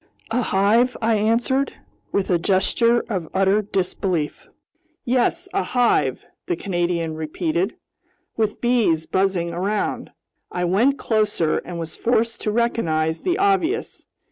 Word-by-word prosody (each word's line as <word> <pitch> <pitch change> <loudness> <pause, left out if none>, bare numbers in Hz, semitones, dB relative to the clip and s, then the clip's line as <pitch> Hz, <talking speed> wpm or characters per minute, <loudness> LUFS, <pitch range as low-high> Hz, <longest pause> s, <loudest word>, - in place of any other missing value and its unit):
"A 245 +2 +1
hive?" 225 +4 +2
I 225 0 +2
answered, 235 +6 +1 0.4
with 195 -1 0
a 175 - +3
gesture 230 +6 +2
of 185 -8 -3
utter 195 +2 +3
disbelief. 185 -5 -2 0.6
"Yes, 260 +9 +1
a 395 - +1
hive," 245 -2 +1 0.2
the 355 - 0
Canadian 175 - -1
repeated, 160 +4 -2 0.6
"with 215 -2 -1
bees 225 -10 +2
buzzing 185 -3 0
around!" 200 +4 -2 0.4
I 180 0 -1
went 230 +11 +3
closer 210 -8 +1
and 175 -1 -7
was 165 -1 -5
forced 230 -1 0
to 215 - -1
recognize 165 -9 0
the 360 0 0
obvious. 390 +1 0
205 Hz, 125 wpm, -22 LUFS, 175-240 Hz, 0.6 s, a